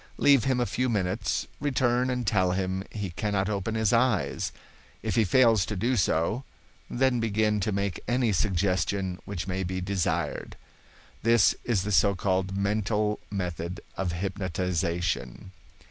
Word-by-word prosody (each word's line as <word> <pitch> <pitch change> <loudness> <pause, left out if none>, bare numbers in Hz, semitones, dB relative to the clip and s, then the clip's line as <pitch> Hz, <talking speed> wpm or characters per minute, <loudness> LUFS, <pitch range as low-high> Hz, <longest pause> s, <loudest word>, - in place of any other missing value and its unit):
Leave 140 -5 +5
him 130 -2 +2
a 120 - +2
few 125 +2 -1
minutes; 100 -1 -1
return 130 -3 +1
and 125 -1 -1
tell 95 -3 +2
him 95 0 -1
he 105 -4 -5
cannot 100 +1 -1
open 105 +1 -2
his 110 0 +2
eyes. 120 -3 +1 0.5
If - - -1
he 115 - +4
fails 110 0 +4
to 105 - -3
do 120 +7 +1
so, 95 +5 +1 0.5
then 130 -1 +2
begin 110 -1 +1
to 105 +2 -1
make 100 -2 -2
any 120 -1 +2
suggestion 95 -1 0
which 95 -3 -4
may 95 0 -2
be 95 0 -2
desired. 95 -1 -2 0.7
This 115 0 +5
is 110 -7 +1
the 105 - -3
so 100 +1 +4
called 95 +1 -1
mental 105 +1 0
method 90 -2 -4 0.2
of 95 -3 -1
hypnotization. 90 -4 -2
100 Hz, 145 wpm, -27 LUFS, 95-115 Hz, 0.7 s, Leave